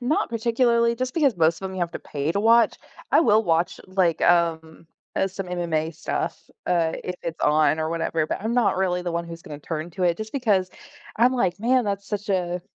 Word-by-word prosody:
not 250 +5 0
particularly, 235 0 +2
just 255 +2 -3
because 280 - +2
most 165 +1 +2
of 190 - -3
'em 190 - -8
you 185 - -4
have 170 -1 -1
to - - -5
pay 145 +2 -3
to 200 - 0
watch, 230 +1 +4 0.3
I - - +5
will 220 -7 +4
watch, 170 -2 0
like, 185 -4 +1
um 165 -2 +1 0.3
uh, - - +1
some 195 +1 -6
MMA 170 -3 -1
stuff, - - -4 0.2
uh, 170 -2 +1
if 180 - -3
it's 165 0 -5
on, 155 +1 +3
or 160 0 -1
whatever, 165 -1 -1
but - - -3
I'm 220 +3 -2
not 240 -6 +2
really 180 -2 0
the 175 -1 -3
one 170 0 -2
who's 165 0 -9
gonna 150 -2 -9
turn 155 +2 -5
to 185 +2 -5
it, 170 -1 +2
just 220 0 -7
because 205 -9 +1 0.5
I'm 245 +3 +4
like, 190 -5 0
"Man, 250 +1 +2
that's 200 -1 -3
such 205 0 -4
a" 180 -2 -1
180 Hz, 220 wpm, -24 LUFS, 165-225 Hz, 0.5 s, I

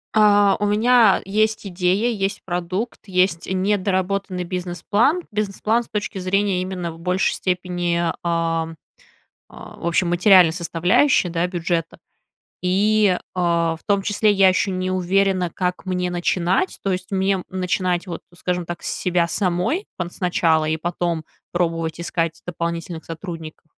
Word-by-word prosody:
А, 205 -2 +5
у 205 - +1
меня 220 -1 +4
есть 215 +2 0
идея, 185 +5 +1
есть 195 0 -2
продукт, 180 +6 -3
есть 185 -2 +1
недоработанный 190 -1 0
бизнес-план, 185 - 0
бизнес-план 215 +3 0
с - - -17
точки 205 -2 -3
зрения 190 0 +1
именно 185 -2 -4
в 165 - -12
большей 180 +2 +1
степени, 180 -1 -1
а, 170 -1 0
а, 165 -1 -1 1.0
в - - -8
общем 170 +1 +1
материальной 175 -2 +6
составляющей, 175 - +2
да, 170 +1 0
бюджета, 170 -2 -2 0.6
и, 200 +1 +3 0.2
а, 170 -2 +1
в - - -27
том 200 -1 +2
числе 210 +1 +2
я 195 -1 +5
еще 190 +2 +1
не 185 0 -2
уверена, 185 0 +1
как 180 +1 -3
мне 180 -1 -1
начинать. 175 - 0
То 195 - 0
есть, 185 0 -3
мне 190 -1 +1
начинать, 180 -1 -1
вот 170 -2 -6 0.2
скажем 180 -1 -2
так, 175 - -6
с - - -4
себя 175 -2 0
самой 185 - -1
пон 175 -1 -4
сначала, 165 -4 +1
и 160 +1 0
потом 170 -1 -2 0.3
пробовать 165 -2 -1
искать 165 -1 -2
дополнительных 170 -1 -4
сотрудников, 165 -2 -8
180 Hz, 140 wpm, -21 LUFS, 170-195 Hz, 1.0 s, материальной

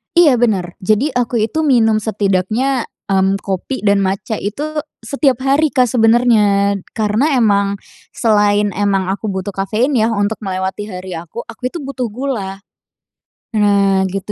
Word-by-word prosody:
Iya 300 -9 +5
benar. 190 -7 0
Jadi, 215 +9 +1
aku 245 -1 -1
itu 230 +8 -2
minum 230 -8 +3
setidaknya, 215 +5 0 0.2
mmm, 195 0 +2
kopi 195 +7 -4
dan 200 -1 +3
matcha 195 +3 -2
itu 210 +9 -4 0.4
setiap 265 0 0
hari, 280 +3 +3
Kak 255 -5 +1
sebenarnya 220 -4 +3 0.2
karena 225 +7 +1
emang 200 -4 +2 0.4
selain 205 -2 +2
emang 195 -1 0
aku 200 +3 -4
butuh 190 0 -3
kafein 210 +8 -1
yah 225 -5 +2
untuk 205 +2 -1
melewati 190 0 -3
hari 185 -2 -7
aku, 170 +8 -8
aku 250 +3 -6
itu 345 - -7
butuh 260 -3 -3
gula. 210 -5 -4 0.9
Nah 200 -3 +2
gitu, 195 +2 -5
210 Hz, 145 wpm, -17 LUFS, 195-245 Hz, 0.9 s, Iya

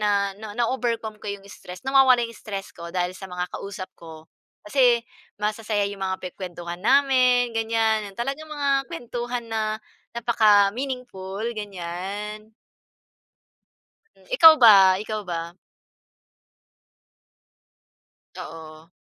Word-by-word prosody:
na 200 -1 +1
na 210 0 -8
na-overcome 230 -3 -1
ko - - -20
yung 200 -1 -6
stress, 180 -2 -11
nawawala 265 -2 +6
yung 230 - -12
stress 200 -2 -6
ko 170 0 -8
dahil 180 0 -1
sa 195 - -9
mga 180 0 -3
kausap 195 -1 -7
ko 160 -1 -12 0.3
kasi 240 +1 +3 0.4
masasaya 210 -1 -1
yung 200 -1 -9
mga 190 0 -2
pinag-kwentuhan 175 -2 -7
namin, 255 -1 +4
ganyan. 225 -1 +1
Yung - - -24
talagang 275 +6 -3
mga 280 -2 0
kwentuhan 240 -6 -5
na 215 -1 -2 0.3
napaka 215 -3 +4
meaningful, 245 -8 -5 0.2
ganyan. 205 +2 -6 1.8
Ikaw 325 -10 +9
ba? 195 -5 +7
Ikaw 215 0 -4
ba? 170 -1 -5 2.8
Oo. 160 0 -10
215 Hz, 110 wpm, -24 LUFS, 190-240 Hz, 2.8 s, Ikaw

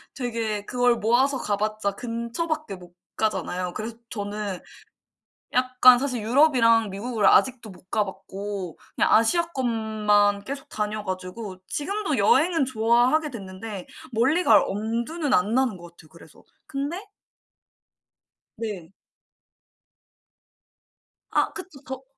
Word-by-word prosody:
되게 225 -5 -3
그걸 245 -1 +2
모아서 260 +5 +2
가봤자 210 0 -1
근처밖에 235 +3 -4
못 180 -1 -15 0.2
가잖아요. 180 -4 -1
그래서 225 +1 -6
저는 205 -3 -4 0.9
약간 255 0 +6
사실 255 -4 -2
유럽이랑 230 -3 +4
미국을 215 +2 -1
아직도 240 -5 +3
못 185 +1 -17
가봤고 195 -2 -4 0.2
그냥 - - +2
아시아권만 220 -8 +2
계속 275 +2 -6
다녀 210 0 -3
가지고. 185 +2 -5
지금도 400 +8 -2
여행은 340 - +3
좋아하게 250 +6 +2
됐는데 195 -2 -7 0.3
멀리 270 +11 +2
갈 220 -7 +6
엄두는 235 - -2
안 200 +6 +2
나는 255 -6 +2
것 175 -1 -12
같아요. 160 -2 -19
그래서 - - -17 0.2
근데 285 +6 -3 1.6
네. 200 -7 -6 2.4
아 - - +2
그쵸. 365 -8 -10
더 265 0 -7
225 Hz, 250 characters per minute, -25 LUFS, 205-260 Hz, 2.4 s, 약간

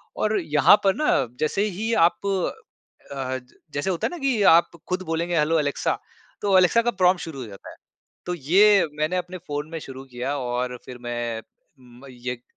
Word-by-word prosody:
और 215 0 +1
यहाँ 155 +2 +5
पर 195 -1 +3
ना 305 - -1 0.3
जैसे 155 +6 0 0.2
ही 225 +2 -1 0.2
आप 200 - -17 0.9
अ, 130 -1 -3 0.3
जैसे 145 +6 -1
होता 175 -3 0
है - - -8
ना 350 - -6
कि 270 -7 0 0.2
आप 170 - +1 0.2
खुद 180 +1 -1
बोलेंगे 170 +1 0
हेलो 160 +2 +2
एलेक्सा। 145 -2 -1 0.4
तो 200 -2 +4
एलेक्सा 185 +5 +5
का 240 +1 0
प्रॉम्प्ट 185 -3 +2
शुरू 160 -5 -7
हो - - -5
जाता 100 -2 -11
है। - - -12 0.5
तो 180 - -2
ये 190 +6 +5
मैंने 155 +4 0
अपने 180 +1 -4
फ़ोन 145 +1 -4
में 165 - -5
शुरू 135 -3 -9
किया 125 +2 -4
और 125 -1 -2
फिर 125 - -9
मैं 120 -2 -3 0.4
म 125 +1 -16
येक 125 0 -6
155 Hz, 185 wpm, -24 LUFS, 130-185 Hz, 0.9 s, यहाँ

